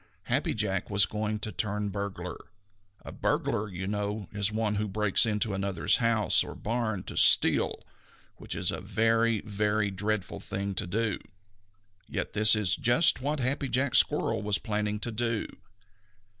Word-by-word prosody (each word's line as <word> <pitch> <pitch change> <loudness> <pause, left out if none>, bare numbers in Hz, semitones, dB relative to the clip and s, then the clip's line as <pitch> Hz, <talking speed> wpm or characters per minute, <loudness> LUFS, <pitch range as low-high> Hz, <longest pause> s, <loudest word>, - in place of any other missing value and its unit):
Happy - - 0
Jack 95 -3 -1
was 100 -2 +5
going 105 +3 -3
to 105 0 -4
turn 105 -1 -2
burglar. 95 -3 -6 0.6
A - - -7
burglar, 105 0 -1
you 95 0 -6
know, 105 0 -3
is 105 0 -1
one 110 -1 -1
who 105 +1 -1
breaks 105 +2 +2
into 105 0 -1
another's 95 -3 +1
house 115 -3 +3
or - - -8
barn 110 -3 -2
to - - -8
steal, - - +4 0.5
which - - -6
is - - +1
a - - -5
very, 115 +2 +1
very 105 0 -1
dreadful 100 0 -3
thing 100 0 -4
to 90 - -2
do. 105 +1 -1 0.9
Yet - - -3
this 110 +1 +6
is 105 -4 +2
just 130 +2 +3
what 145 +2 -2
Happy 135 +2 -1
Jack 130 +1 0
Squirrel - - +3
was 105 -1 +1
planning 105 0 -2
to 120 - -1
do. 115 0 -1
105 Hz, 155 wpm, -28 LUFS, 100-115 Hz, 0.9 s, this